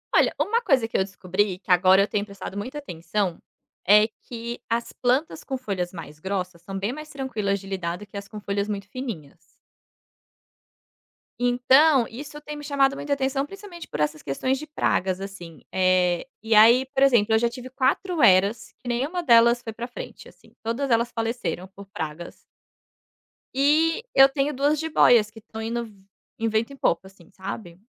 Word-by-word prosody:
Olha, - - +4
uma 460 +3 +1
coisa 265 - +2
que - - -1
eu 190 - +3
descobri, 185 0 -2
que 195 - -5
agora 185 +2 +6
eu 200 - +2
tenho 205 0 -1
prestado 200 -1 -8
muita 255 +8 -5
atenção, 180 - -3 0.5
é 210 +2 +6 0.2
que 235 0 -6
as 230 +1 -1
plantas 260 +6 0
com 265 - -3
folhas 190 -8 -3
mais 155 -3 -9
grossas 180 -2 -4
são 195 +2 -6
bem 200 +5 -2
mais 305 +1 -9
tranquilas 220 -8 -2
de 195 - -12
lidar 175 -3 -3
do 210 - -11
que 200 - -9
as 200 0 -7
com 210 - -8
folhas 200 0 -2
muito 200 -1 -4
fininhas. 220 - -7 2.0
Então, 255 +2 +4
isso 295 +5 -9
tem 300 0 -7
me 295 - -9
chamado 275 -1 +2
muita 285 0 -2
atenção 270 0 0
principalmente 375 -1 -10
por 150 - -6
essas 150 0 -1
questões 260 - -1
de 305 - -7
pragas 190 -10 0
assim. 175 -5 -9
Eh, 185 +1 +2
e 225 0 +1
aí 235 +5 +7
por 270 0 +1
exemplo 235 -5 +4
eu - - +6
já 235 - +2
tive 250 +1 -9
4 275 +5 0
heras 200 +2 +4
que 245 - -13
nenhuma 275 +9 -1
delas 235 -3 +5
foi 225 - -6
para 235 +2 -6
frente 245 - -9
assim, - - -20
todas 245 +5 -2
elas 235 +1 +2
faleceram 225 -5 -3
por 200 0 -10
pragas. 160 -2 -6 1.2
E 310 - +3
eu 270 0 +8
tenho 275 +2 -1
2 290 +3 +1
jibóias 245 -9 +4
que 225 - -13
estão 220 0 -9
indo 235 +1 -2
v 215 - -15 0.5
em 225 - 0
vento 220 +4 0
e - - -9
pouco 190 -6 0
assim, 190 -3 -19
sabe? 190 -2 -7
225 Hz, 185 wpm, -24 LUFS, 195-270 Hz, 2.0 s, eu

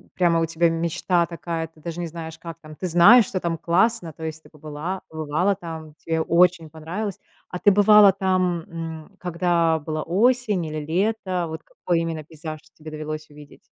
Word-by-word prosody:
прямо 170 -2 +3
у - - +2
тебя 165 +1 +1
мечта 170 +1 0
такая, 165 -1 -4
ты 160 0 -24
даже 170 +2 -6
не 170 - -3
знаешь, 160 -1 -8
как 165 -1 -8
там 155 -1 -12
ты 185 - -4
знаешь, 200 +7 +7
что 185 - -3
там 170 -2 -2
классно. 175 +2 +1
То 160 - -11
есть 160 0 -5
ты - - -17
побыла 155 +5 -6
побывала 160 +5 0
там, 160 -4 -8
тебе 160 0 -2
очень 170 -1 +3
понравилось. 175 +6 -5 0.3
А 180 - -5
ты 205 - +5
бывала 205 0 +7
там, 185 -2 0
м, 165 0 -7
когда 170 -2 +1
была 155 +1 -4
осень 210 -1 +1
или 155 -1 -4
лето? 185 0 -1
Вот 160 0 -6
какой 175 -2 -2
именно 165 -2 -4
пейзаж 155 0 -8 0.2
тебе 155 0 -10
довелось 155 0 -6
увидеть? 145 -1 -15
165 Hz, 185 wpm, -23 LUFS, 160-180 Hz, 0.3 s, знаешь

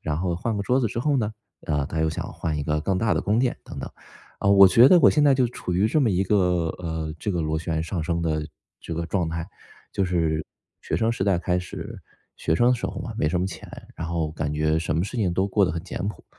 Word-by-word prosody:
然 75 -1 -2
后， 90 0 -1
换 105 +6 -2
个 100 - -2
桌 125 +5 +2
子 120 - +1
之 115 +2 -4
后 140 +3 +1
呢？ 110 -2 -1 0.3
啊， 75 -2 0
他 80 +2 -3
又 80 - +2
想 80 - -5
换 80 -2 -3
一 75 - -2
个 75 +1 -1
更 95 +4 0
大 110 +1 +1
的 80 - +1
宫 105 +3 +1
殿 125 0 0
等 - - -9
等。 - - -6 0.5
啊， - - 0
我 100 -1 +8
觉 115 +7 +7
得 180 - +7
我 - - +7
现 150 - +2
在 145 -2 +5
就 130 -2 +2
处 90 -6 -5
于 95 +4 +3
这 150 +8 +2
么 130 - +3
一 95 0 +1
个， 105 +3 +2 0.4
呃， 80 -3 -4
这 105 - -3
个 85 -3 -1
螺 80 0 -1
旋 80 -1 -2
上 85 +1 -3
升 85 +1 -1
的 80 -2 -1 0.3
这 85 - -6
个 85 +1 -2
状 85 0 -1
态。 85 +1 -4 0.5
就 - - 0
是 80 -3 0 0.4
学 - - -2
生 115 +1 +1
时 115 - -3
代 95 -2 +2
开 90 +1 0
始 90 - -7 0.4
学 80 - 0
生 120 +8 +4
的 125 - +4
时 120 - -3
候 - - -6
嘛， - - -6
没 75 - +2
什 90 +3 0
么 90 - 0
钱， 95 - -8 0.3
然 80 - -5
后 80 -2 -1
感 75 -2 -3
觉 75 +1 +1
什 80 -1 -2
么 85 - +1
事 120 +5 -5
情 95 -6 +1
都 95 +2 +1
过 100 +1 +1
得 - - -1
很 80 +1 -4
简 - - -6
朴， 105 - -8
90 Hz, 295 characters per minute, -24 LUFS, 80-105 Hz, 0.5 s, 我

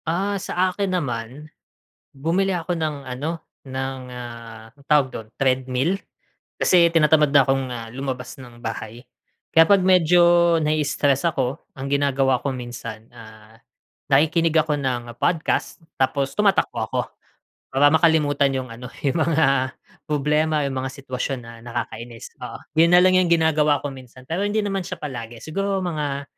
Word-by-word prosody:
Ah, 195 +4 -1
sa 185 0 0
akin 190 -1 -1
naman, 130 +1 -5 0.6
bumili 175 +7 0
ako 175 0 -2
ng 155 -3 -2
ano, 140 +6 -5 0.2
ng 130 0 -4
ah, 115 -2 -9
anong 140 +3 -24
tawag 150 -3 +4
dun, 110 -3 -8
Treadmill? 130 +6 0 0.6
Kasi 170 -2 +4
tinatamad 150 -2 +4
na 145 - +8
akong 135 -1 +1
ah, 115 -1 -7
lumabas 130 0 -5
ng 120 -3 -13
bahay. 115 0 -6 0.5
Kaya 165 0 +7
'pag 200 -1 +6
medyo 175 -1 +5
nai-istress 150 -1 +1
ako, 135 -4 0 0.2
ang 135 +1 -5
ginagawa 135 -2 +2
ko 140 - 0
minsan, 115 -3 -8
ah, 110 -1 -14 0.5
nakikinig 160 +3 +3
ako 155 -1 +2
ng 120 -4 -3
podcast, 165 +4 -1 0.2
tapos 135 +1 0
tumatakbo 205 -2 +2
ako. - - 0 0.7
Para 140 +2 +5
makalimutan 150 -4 +3
'yung 130 -1 -4
ano, 125 +2 -9 0.2
'yung 145 +4 +1
mga 140 -5 +2 0.4
problema, 150 +1 +1
'yung 140 - -2
mga 130 0 -2
sitwasyon 130 0 -4
na 115 - -10
nakakainis. 115 -1 -6
Oo. - - -7 0.2
'Yun 170 +1 +5
na - - +7
lang 185 - +5
'yung 185 -1 +3
ginagawa 155 -3 +3
ko - - -1
minsan 130 -1 -13
pero 165 +4 -2
hindi 205 +1 +1
naman 195 -1 -1
siya - - -5
palagi, 120 -5 -6
siguro 195 +4 -2
mga 145 -5 -3
140 Hz, 150 wpm, -22 LUFS, 130-165 Hz, 0.7 s, na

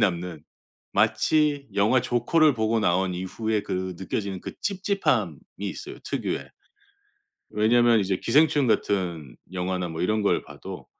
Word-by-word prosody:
남는, 90 -6 -1 0.5
마치 150 -3 +2
영화 105 +6 +3
조커를 140 +6 +3
보고 110 0 +1
나온 90 -1 +1
이후에 105 +4 -2
그 95 -2 -3
느껴지는 95 0 -3
그 - - -6
찝찝함이 200 0 0 0.2
있어요 - - -6
특유의. - - -3 1.0
왜냐하면 115 +2 +4
이제 95 -1 0
기생충 150 -2 +3
같은 85 - -1 0.2
영화나 90 -1 -2
뭐 80 +1 -4
이런 110 +3 +1
걸 100 - +2
봐도 - - -10
105 Hz, 285 characters per minute, -25 LUFS, 90-120 Hz, 1.0 s, 왜냐하면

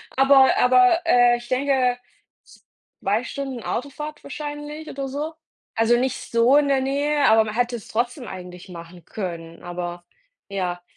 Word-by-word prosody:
Aber 270 0 +5
aber, 250 +5 +5
äh, 245 -5 +5
ich 240 - -12
denke 255 -1 +1 1.0
2 205 +4 +1 0.4
Autofahrt 295 +3 -5
wahrscheinlich 295 +1 -7
oder 275 -1 -5
so. 300 +4 -4 0.4
Also 225 +2 +3
nicht 255 +1 0 0.2
so 235 +4 +4
in 295 -1 +3
der 275 -1 +3
Nähe, 285 +2 +1
aber 220 0 +6
man 215 -1 -5
hätte 245 0 0
es 225 - -9
trotzdem 245 +3 -2
eigentlich 180 -1 -9
machen 170 0 -11
können. 170 -4 -7
Aber 175 0 -6 0.4
ja, 180 -3 -3
245 Hz, 140 wpm, -23 LUFS, 195-280 Hz, 1.0 s, aber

